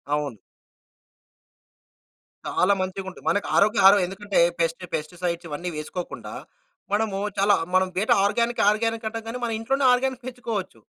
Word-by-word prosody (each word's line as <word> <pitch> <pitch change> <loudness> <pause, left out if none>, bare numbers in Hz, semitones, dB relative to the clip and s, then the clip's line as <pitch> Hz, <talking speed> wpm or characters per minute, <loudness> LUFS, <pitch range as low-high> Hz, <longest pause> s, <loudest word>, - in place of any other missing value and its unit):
అవును. 145 -7 -3 2.1
చాలా 195 +2 +3
మంచిగా 190 +1 -4
ఉంటుంది. 185 - -14
మనకు 205 - 0
ఆరోగ్య 210 0 +4
ఆహారం 200 +1 +8
ఎందుకంటే 200 +1 -2 0.2
పెస్టి 165 +2 -1
పెస్టిసైడ్స్ 170 +2 -4
ఇవన్నీ 175 +5 -4
వేసుకోకుండా 170 +4 -6 0.6
మనము 205 -2 0 0.2
చాలా 200 +1 +4 0.2
మనం 185 0 +4
బేటా 210 - +3
ఆర్గానిక్ 235 +4 +1
ఆర్గానిక్ 225 +1 -1
అంటాం 225 0 -5
కానీ 230 +2 -4
మన 235 - -1
ఇంట్లోనే 270 +4 0
ఆర్గానిక్ 260 0 -1
పెంచుకోవచ్చు. 230 - -5
200 Hz, 130 wpm, -24 LUFS, 180-225 Hz, 2.1 s, ఆహారం